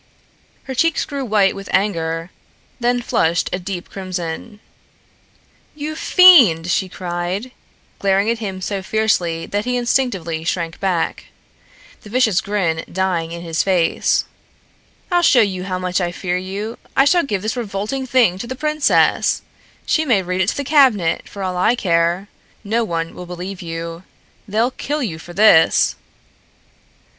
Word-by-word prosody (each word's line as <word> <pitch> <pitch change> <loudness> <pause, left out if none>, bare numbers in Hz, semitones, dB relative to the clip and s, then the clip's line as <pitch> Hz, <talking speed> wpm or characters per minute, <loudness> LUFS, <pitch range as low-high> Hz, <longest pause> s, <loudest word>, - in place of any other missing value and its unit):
Her 265 - -6
cheeks 330 +5 +1
grew 280 -2 -4
white 210 -5 +2
with 195 0 -9
anger, 165 -3 -1 0.5
then 245 0 0
flushed 165 -6 0
a 180 - -1
deep 180 -1 -6
crimson. 185 +2 -5 1.2
"You 305 +1 -5
fiend!" 250 - +6
she 185 +1 0
cried, 180 +6 -4 0.5
glaring 195 +1 +2
at 230 0 0
him 190 -4 -5
so 195 +1 -3
fiercely 190 -6 0
that 205 +2 -3
he 250 0 0
instinctively 200 -10 -1
shrank 165 0 -3
back, 180 -4 -1 0.8
the 210 - -13
vicious 220 -5 +2
grin 185 -6 -1
dying 175 -3 -1
in 170 0 -7
his 165 -2 -1
face. 180 -4 +1 0.9
"I'll 350 0 +3
show 265 -7 +5
you 185 -3 -1
how 185 -1 -2
much 185 +1 -1
I 175 -1 -1
fear 180 0 -3
you. 195 +5 -5 0.2
I 270 - +6
shall 345 +4 +4
give 205 - -3
this 215 +3 -2
revolting 230 +3 -3
thing 235 -8 +3
to 235 - -5
the 260 - -5
princess. 305 +1 +2 0.4
She 315 - +2
may 230 -10 +2
read 185 +1 -2
it 185 - +2
to - - -3
the 285 - -2
cabinet, 260 - +3
for 200 - -7
all 185 -1 -2
I 215 +7 +3
care. 170 -1 0 0.4
No 225 +3 0
one 165 -5 -3
will 180 - -9
believe 180 +2 -7
you. 165 0 -6 0.5
They'll 225 +5 +1
kill 295 +3 -3
you 165 -9 -4
for 175 +2 -11
this!" 190 -5 +5
195 Hz, 155 wpm, -19 LUFS, 175-235 Hz, 1.2 s, fiend